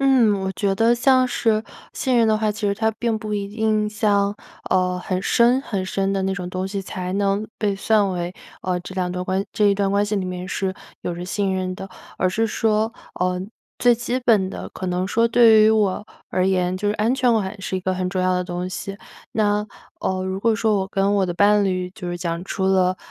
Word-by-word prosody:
嗯， 260 -6 +4
我 190 - -2
觉 195 0 0
得 225 +3 +3
像 255 +1 +4
是 225 -3 +1 0.3
信 260 -4 0
任 230 - +4
的 215 - +3
话， 215 0 0
其 210 0 -3
实 200 - +1
它 220 +1 +1
并 230 0 -1
不 215 -1 -5
一 200 -1 -1
定 215 0 0
像， 205 -1 +1 0.3
呃， 180 -1 +1
很 185 +1 -3
深 240 +3 +4
很 195 -8 -3
深 195 +1 -1
的 195 - 0
那 190 0 0
种 180 -2 -5
东 185 +1 -2
西 195 0 -4
才 185 -1 -5
能 200 +1 0
被 205 -2 0
算 205 -1 +2
为， 175 0 -3 0.3
呃， 180 -1 -1
这 185 - -9
两 180 -1 0
段 180 0 -3
关 190 +1 -1
这 210 - +2
一 200 - +4
段 200 0 0
关 200 +1 +2
系 205 0 -1
里 190 - -1
面 180 0 -5
是 190 -1 -2 0.3
有 175 - -3
着 175 +1 -6
信 195 +1 -1
任 185 0 -2
的。 195 - -7 0.3
而 185 - +2
是 220 +5 0
说， 220 0 +1 0.3
呃， 180 0 +1 0.4
最 245 -1 +5
基 240 +2 -2
本 220 -7 +2
的 - - -6
可 185 - -6
能 180 +1 -1
说 230 +3 +2
对 225 -2 +6
于 215 - +6
我 210 -2 +1 0.2
而 185 - 0
言， 185 -1 +1
就 205 +2 -1
是 210 - +1
安全感 220 -4 +1
是 190 - -2
一 - - -3
个 185 0 -1
很 185 0 -2
重 185 -1 -1
要 185 0 +2
的 180 - 0
东 180 0 -4
西。 195 +1 -6 0.4
那， 210 -1 +1 0.4
呃， 185 0 -1
如 190 0 -3
果 230 0 +3
说 215 +1 +2
我 190 - -3
跟 195 +1 +1
我 195 -2 +2
的 175 - -2
伴 205 +2 +4
侣 185 -1 -1
就 185 -3 -7
是 175 - -3
讲 170 -1 -3
出 190 -1 -2
了， 185 -1 +3
200 Hz, 250 characters per minute, -22 LUFS, 185-215 Hz, 0.4 s, 对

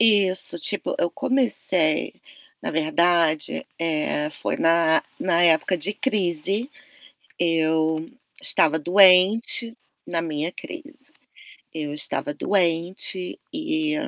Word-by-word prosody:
Isso, 195 -5 +3
tipo, 205 +5 -3
eu 175 - +1
comecei, 185 - +1 0.5
na - - -4
verdade, 160 0 0
eh, 155 -2 -1
foi - - -4
na 165 -1 +2 0.2
na 175 -2 +2
época 170 +2 +3
de 185 +6 0
crise. 205 - 0 0.7
Eu 160 -1 0 0.3
estava 160 0 +3
doente 195 +7 +4 0.3
na 165 -1 -3
minha 155 0 -3
crise. 295 - -11 0.6
Eu 150 -2 -5
estava 150 0 -3
doente 180 +1 -2
e 315 0 -2
175 Hz, 100 wpm, -22 LUFS, 160-205 Hz, 0.7 s, doente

